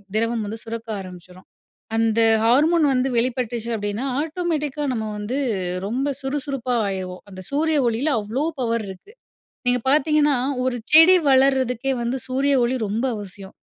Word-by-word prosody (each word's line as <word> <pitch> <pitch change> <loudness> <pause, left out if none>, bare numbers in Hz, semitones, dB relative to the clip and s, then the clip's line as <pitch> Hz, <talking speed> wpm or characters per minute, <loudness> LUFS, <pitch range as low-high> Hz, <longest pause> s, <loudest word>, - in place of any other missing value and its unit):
திரவம் 230 0 0
வந்து 215 +2 -5
சுரக்க 230 0 -6
ஆரம்பிச்சுரும். 185 0 -12 0.5
அந்த 225 0 +2 0.2
ஹார்மோன் 305 +7 +4
வந்து 255 +1 +1
வெளிப்பட்டுச்சு 235 -1 -1
அப்படீன்னா 205 +3 -3 0.2
ஆட்டோமேட்டிக்கா 310 -3 -2
நம்ம 220 -2 -3
வந்து 210 +6 -3 0.5
ரொம்ப 255 +6 -1
சுறுசுறுப்பா 270 -2 -2
ஆயிருவோம். 185 -2 -5
அந்த 185 0 -9
சூரிய 310 +2 +1
ஒளியில 240 +7 0
அவ்ளோ 225 +7 -3 0.2
பவர் 230 -2 -1
இருக்கு. 190 - -12 0.5
நீங்க 250 0 +3
பார்த்தீங்கன்னா, 295 0 +3 0.3
ஒரு 255 -1 -1
செடி 325 +4 +9 0.2
வளர்றதுக்கே 265 -1 +2
வந்து 240 +2 -1
சூரிய 275 +2 +1
ஒளி 240 +2 0
ரொம்ப 220 +5 -1
அவசியம். 195 -1 -9
250 Hz, 135 wpm, -22 LUFS, 220-280 Hz, 0.5 s, செடி